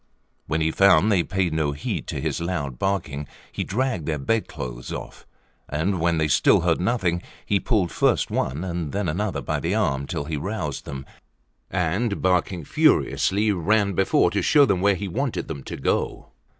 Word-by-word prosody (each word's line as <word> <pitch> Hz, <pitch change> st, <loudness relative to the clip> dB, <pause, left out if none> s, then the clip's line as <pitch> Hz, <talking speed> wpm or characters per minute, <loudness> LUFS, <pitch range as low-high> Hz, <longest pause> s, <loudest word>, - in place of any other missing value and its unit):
When 80 Hz, +1 st, 0 dB
he 80 Hz, 0 st, +2 dB
found 100 Hz, +2 st, +5 dB
they 95 Hz, -4 st, +4 dB
paid 95 Hz, -1 st, -1 dB
no 75 Hz, -2 st, 0 dB
heed 70 Hz, -, -4 dB
to -, -, -3 dB
his -, -, -2 dB
loud 75 Hz, -8 st, -3 dB
barking, 75 Hz, -8 st, -2 dB, 0.2 s
he -, -, -3 dB
dragged 115 Hz, -, -1 dB
their 80 Hz, -2 st, 0 dB
bed 110 Hz, +11 st, 0 dB
clothes 60 Hz, -5 st, -7 dB
off; -, -, -8 dB, 0.4 s
and 85 Hz, +6 st, -1 dB
when 85 Hz, 0 st, +2 dB
they 80 Hz, -1 st, +2 dB
still 75 Hz, -, +4 dB
heard 85 Hz, 0 st, +1 dB
nothing, 90 Hz, -5 st, 0 dB, 0.2 s
he 100 Hz, -, +2 dB
pulled 100 Hz, -7 st, 0 dB
first -, -, +1 dB
one 70 Hz, +6 st, -1 dB
and 85 Hz, -5 st, -3 dB
then 100 Hz, -2 st, -1 dB
another 95 Hz, +6 st, -1 dB
by -, -, -1 dB
the -, -, -1 dB
arm 70 Hz, 0 st, 0 dB
till 70 Hz, -, -3 dB
he 75 Hz, 0 st, -3 dB
roused 85 Hz, -4 st, -4 dB
them, 70 Hz, -1 st, -6 dB, 0.6 s
and, 95 Hz, +5 st, 0 dB
barking 90 Hz, -2 st, 0 dB
furiously, 105 Hz, +8 st, +2 dB
ran 100 Hz, +2 st, +2 dB
before 95 Hz, +2 st, +3 dB
to -, -, 0 dB
show 145 Hz, -2 st, +5 dB
them 90 Hz, -8 st, +1 dB
where 100 Hz, 0 st, +4 dB
he 100 Hz, +2 st, -4 dB
wanted 125 Hz, +7 st, -2 dB
them 75 Hz, -4 st, -5 dB
to -, -, -6 dB
go. 65 Hz, -, -1 dB
90 Hz, 185 wpm, -24 LUFS, 75-100 Hz, 0.6 s, found